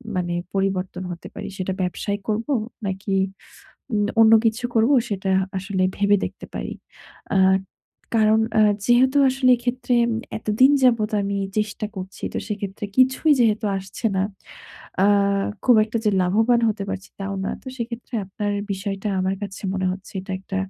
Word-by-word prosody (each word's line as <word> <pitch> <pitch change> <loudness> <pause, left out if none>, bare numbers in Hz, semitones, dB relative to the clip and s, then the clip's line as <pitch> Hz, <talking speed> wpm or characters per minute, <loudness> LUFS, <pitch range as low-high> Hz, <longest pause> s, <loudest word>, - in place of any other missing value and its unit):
মানে 175 -1 -1 0.2
পরিবর্তন 190 -2 -1
হতে 170 - -8
পারি। 205 - -6
সেটা 190 0 -2
ব্যবসায় 200 +3 -2
করবো 225 +6 -1 0.3
নাকি 195 +1 -3 0.8
উম 205 -1 +2
অন্য 225 0 +7
কিছু 225 +2 0
করবো 230 +5 +4
সেটা 195 -2 -2 0.3
আসলে 190 0 -2
ভেবে 205 0 +4
দেখতে - - -7
পারি। - - -4 0.6
আ - - +4 0.8
কারণ 220 0 +4 0.2
আ - - +6 0.3
যেহেতু 260 +3 +4
আসলে 260 0 +2
এক্ষেত্রে 245 +1 -1
এম 235 - -1 0.3
এতদিন 220 +5 +4
যাবৎ 230 -4 +3
আমি 200 0 -2 0.2
চেষ্টা 210 0 -2
করছি 190 0 -8
তো - - 0
সেক্ষেত্রে 205 0 -4
কিছুই 260 +4 +4
যেহেতু 220 -2 +2
আসছে 195 +4 -11
না। 190 - +2 0.8
আ - - +5 0.6
খুব 245 -2 +6
একটা 220 +1 -4
যে 210 - +4
লাভবান 225 +6 +3
হতে 210 -2 -2
পারছি 195 0 -5
তাও 195 0 -3
না। - - -1
তো - - -28
সেক্ষেত্রে 235 0 -6
আপনার 205 +2 -3 0.2
বিষয়টা 195 +1 -4
আমার 190 +1 0
কাছে 195 -1 -6
মনে 190 -1 -1
হচ্ছে 190 +1 -10
এটা 190 +1 -7
একটা 195 0 -6
205 Hz, 155 wpm, -22 LUFS, 195-230 Hz, 0.8 s, অন্য